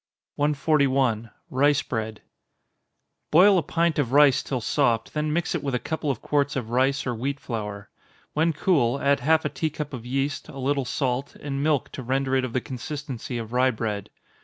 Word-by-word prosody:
141. 140 -6 +2 0.2
Rice 145 +2 +3
Bread. 110 -2 -4 1.1
Boil 185 +4 +6
a - - 0
pint 165 +1 0
of 130 -3 0
rice 145 -2 +6
till 130 - -3
soft 115 -2 +1
then 150 0 -1
mix 170 +2 0
it - - -1
with 135 -3 -2
a - - 0
couple 155 +4 -3
of 130 -5 -2
quarts 145 -1 +1
of 120 -4 -3
rice 135 +3 +2
or 125 - -1
wheat 135 +5 -3
flour. 105 -6 -5 0.5
When 160 +2 +2
cool, 145 -6 +2
add 140 0 +2
half 160 +1 +2
a - - +1
tea 160 - -2
cup 150 -1 -6
of 120 -3 -6
yeast, 135 +3 -2
a 135 - -9
little 135 0 0
salt, 130 +1 -2
and 140 -1 -4
milk 150 -3 +1
to - - -6
render 135 +1 0
it 130 - +2
of 125 -2 -4
the 130 - 0
consistency 130 -1 -5
of 115 0 -6
rye 130 +1 +4
bread. 110 -4 -3
135 Hz, 190 wpm, -25 LUFS, 125-145 Hz, 1.1 s, Boil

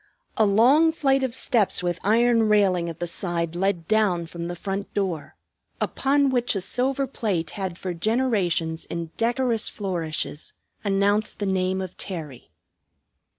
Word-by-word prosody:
A 220 -2 +4
long 260 +11 +5
flight 270 -4 +2
of 260 -2 -1
steps, 215 -8 +1
with 175 0 -1
iron 230 +1 +3
railing 190 -5 +3
at 165 0 -8
the 175 - -1
side, 170 -1 -2
led 180 -2 -1
down 205 -6 +2
from 170 +1 -6
the 175 - -4
front 195 +3 -4
door, 180 -7 -2 0.4
upon 275 0 +1
which 245 -3 +1
a 195 - -1
silver 260 +8 0
plate 200 - -2
had 190 -4 -4
for 185 -1 -4
generations 180 -6 0
in 170 -1 -5
decorous 235 -1 +1
flourishes 165 -6 -3 0.3
announced 205 +1 +1
the 205 - -2
name 190 0 0
of 185 -2 -6
Terry. 155 -9 -6
195 Hz, 150 wpm, -24 LUFS, 175-230 Hz, 0.4 s, long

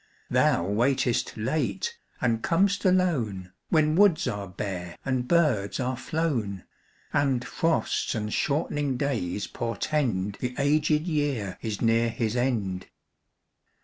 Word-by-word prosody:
Thou 85 - +3
waitest 120 +5 +1
late 115 -4 -1 0.3
and 115 -2 +1
com'st 195 - +2
alone, 125 - +1 0.2
When 155 -1 +3
woods 190 -7 +4
are 100 -5 -3
bare 90 -2 -5
and 130 -2 -1
birds 145 -13 +2
are 130 0 -1
flown, 125 - -2 0.5
And 135 -4 +1
frosts 165 -6 0
and 105 -1 -3
shortening 145 -2 0
days 110 -9 -1
portend 115 -4 -1
The 125 0 -3
aged 150 +2 +2
year 145 - -1
is 110 -2 -3
near 115 0 +3
his 115 0 -2
end. 110 -7 -1
125 Hz, 115 wpm, -27 LUFS, 105-150 Hz, 0.5 s, woods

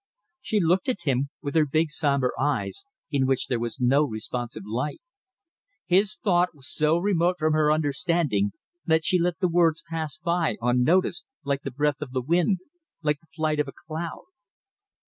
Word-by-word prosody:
She 215 - 0
looked 180 +5 +2
at 250 - -1
him 135 -1 0
with 140 -1 -3
her 155 -2 +3
big 155 +2 +1
sombre 140 -5 +1
eyes, 145 - -1 0.2
in 135 -3 +2
which 135 -1 +1
there 125 - -1
was 120 +3 -4
no 135 +4 +4
responsive 120 -2 -4
light. 125 +8 -3 0.9
His 195 +4 +3
thought 180 -4 +2
was 135 -3 -9
so 155 +2 +3
remote 180 -1 +2
from 155 -2 +1
her 155 -1 +3
understanding 145 - +1 0.3
that 160 -1 +2
she 180 - +4
let 175 0 0
the 185 - +1
words 165 -2 +2
pass 160 -3 -4
by 170 0 0
unnoticed, 125 +10 +2 0.2
like 140 0 -1
the 135 - -4
breath 145 +2 0
of 135 -4 -6
the 130 - 0
wind, 175 - +2 0.4
like 150 -1 +1
the 160 - -29
flight 155 -1 -1
of 150 - +1
a 135 - -8
cloud. 160 +1 -6
155 Hz, 175 wpm, -26 LUFS, 135-170 Hz, 0.9 s, no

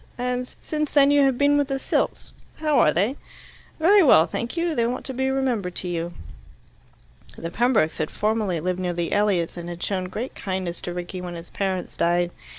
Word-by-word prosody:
And 250 0 -2
since 305 -1 -3
then 285 0 +6
you 290 0 +5
have 265 -2 +2
been 285 +1 +4
with 285 - +1
the 270 -1 -1
Silts. - - -2 0.2
How 305 -2 +2
are 150 - +5
they?" 205 - 0 0.6
"Very 390 +6 +6
well, 245 - +7
thank 235 - -4
you. 335 0 0
They 235 -5 +1
want 250 +2 -4
to 265 - -4
be 265 +1 0
remembered 245 -9 -1
to 185 - -3
you." 170 0 -3 1.2
The 165 - -5
Pembrokes 230 -8 +2
had 155 - -1
formerly 210 -5 0
lived 180 +3 -2
near 180 -1 -1
the 170 -1 -2
Elliots, 195 -5 +1
and 175 0 -6
had 175 0 -6
shown 185 -2 -1
great 220 +8 -5
kindness 185 -3 -4
to 175 - -5
Rickie 180 +1 -5
when 175 -1 -6
his 170 0 -10
parents 190 -2 -2
died. 175 +1 +1
205 Hz, 200 wpm, -24 LUFS, 175-265 Hz, 1.2 s, well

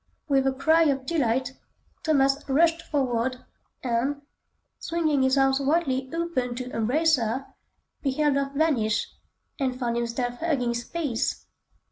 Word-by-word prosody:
With 270 -2 +2
a - - +3
cry 315 +5 +3
of 270 -3 0
delight, 260 -4 0 0.5
Thomas 275 -3 +2
rushed 330 +4 +3
forward, 255 -4 -1 0.5
and, 260 +4 -1 0.6
swinging 320 -5 0
his 260 +1 +3
arms 270 0 +3
widely 270 -3 0
open 330 -8 -2
to 250 +1 -5
embrace 295 +8 +3
her, 240 +3 -2 0.6
beheld 285 +1 +1
her 275 0 0
vanish, 235 -8 +1 0.5
and 260 -2 -1
found 235 -2 -1
himself 240 +1 -2
hugging 275 -8 0
space! 240 +1 -2
270 Hz, 125 wpm, -26 LUFS, 245-305 Hz, 0.6 s, a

